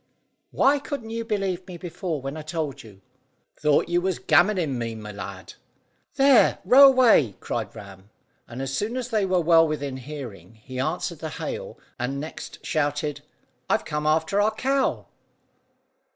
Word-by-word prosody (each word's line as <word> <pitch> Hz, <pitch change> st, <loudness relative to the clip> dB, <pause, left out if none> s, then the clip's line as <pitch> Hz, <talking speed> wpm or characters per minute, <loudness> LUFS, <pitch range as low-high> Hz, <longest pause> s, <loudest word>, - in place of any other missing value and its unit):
"Why 285 Hz, +1 st, +3 dB
couldn't 275 Hz, -6 st, -6 dB
you 230 Hz, 0 st, -3 dB
believe 195 Hz, -5 st, -2 dB
me 180 Hz, -2 st, -8 dB
before, 165 Hz, -3 st, -5 dB
when 135 Hz, +2 st, -4 dB
I 155 Hz, -, -6 dB
told 155 Hz, -2 st, -4 dB
you?" 100 Hz, -4 st, -15 dB, 0.6 s
"Thought 150 Hz, -1 st, +2 dB
you 175 Hz, 0 st, +1 dB
was 185 Hz, -1 st, -1 dB
gammoning 175 Hz, -8 st, +2 dB
me, 115 Hz, -1 st, -3 dB
my 105 Hz, -1 st, -8 dB
lad!" 100 Hz, -3 st, -8 dB, 0.6 s
"There, 275 Hz, -3 st, +5 dB
row 275 Hz, +2 st, +9 dB
away!" 235 Hz, -, +5 dB
cried -, -, -4 dB
Ram; 100 Hz, 0 st, -12 dB, 0.4 s
and 125 Hz, +3 st, -6 dB
as 135 Hz, 0 st, -3 dB
soon 220 Hz, -, -2 dB
as 250 Hz, -1 st, -4 dB
they 215 Hz, -5 st, +1 dB
were 185 Hz, -1 st, +2 dB
well 165 Hz, 0 st, +5 dB
within 145 Hz, -3 st, -3 dB
hearing 120 Hz, -, -9 dB
he 130 Hz, +4 st, -9 dB
answered 160 Hz, +3 st, -2 dB
the 160 Hz, -, -5 dB
hail, -, -, -6 dB, 0.2 s
and 130 Hz, +3 st, -2 dB
next 155 Hz, +3 st, -8 dB
shouted 145 Hz, -1 st, -1 dB, 0.5 s
"I've -, -, +1 dB
come 150 Hz, 0 st, -2 dB
after 160 Hz, +6 st, +2 dB
our 215 Hz, +1 st, +1 dB
cow." 270 Hz, +3 st, 0 dB
155 Hz, 160 wpm, -24 LUFS, 135-205 Hz, 0.6 s, row